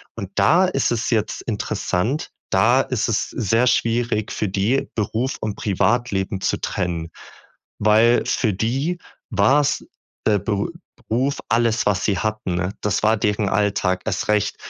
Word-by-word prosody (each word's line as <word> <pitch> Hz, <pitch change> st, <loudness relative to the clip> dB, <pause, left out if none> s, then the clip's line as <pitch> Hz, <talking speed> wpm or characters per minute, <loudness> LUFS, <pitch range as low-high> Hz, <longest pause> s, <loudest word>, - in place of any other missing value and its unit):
Und 100 Hz, -5 st, -6 dB
da 165 Hz, -, +4 dB
ist 135 Hz, -10 st, 0 dB
es 120 Hz, 0 st, -1 dB
jetzt 110 Hz, -3 st, 0 dB
interessant, 115 Hz, -, -2 dB, 0.2 s
da 120 Hz, +7 st, +4 dB
ist 130 Hz, -5 st, -1 dB
es 115 Hz, -2 st, 0 dB
sehr 115 Hz, +2 st, +1 dB
schwierig 115 Hz, -3 st, +1 dB
für 105 Hz, -, -2 dB
die, 100 Hz, +8 st, 0 dB
Beruf 115 Hz, +4 st, -1 dB
und 105 Hz, -2 st, -3 dB
Privatleben 100 Hz, -2 st, 0 dB
zu -, -, 0 dB
trennen, 85 Hz, -2 st, -3 dB, 0.7 s
weil 110 Hz, +3 st, +4 dB
für 110 Hz, -5 st, +1 dB
die 135 Hz, -, -1 dB, 0.3 s
war's 145 Hz, +1 st, +2 dB, 0.4 s
der 105 Hz, -2 st, +3 dB
Be 100 Hz, +1 st, -1 dB, 0.4 s
Beruf 130 Hz, +5 st, 0 dB
alles, 115 Hz, 0 st, +2 dB
was 100 Hz, -3 st, +1 dB
sie 100 Hz, -3 st, +1 dB
hatten, 105 Hz, -2 st, -2 dB
ne? 90 Hz, +1 st, -1 dB
Das 105 Hz, 0 st, -1 dB
war 110 Hz, +1 st, +4 dB
deren 105 Hz, -1 st, 0 dB
Alltag 100 Hz, -2 st, 0 dB
erst 105 Hz, -1 st, -2 dB
recht 105 Hz, -1 st, +1 dB
110 Hz, 145 wpm, -21 LUFS, 100-120 Hz, 0.7 s, da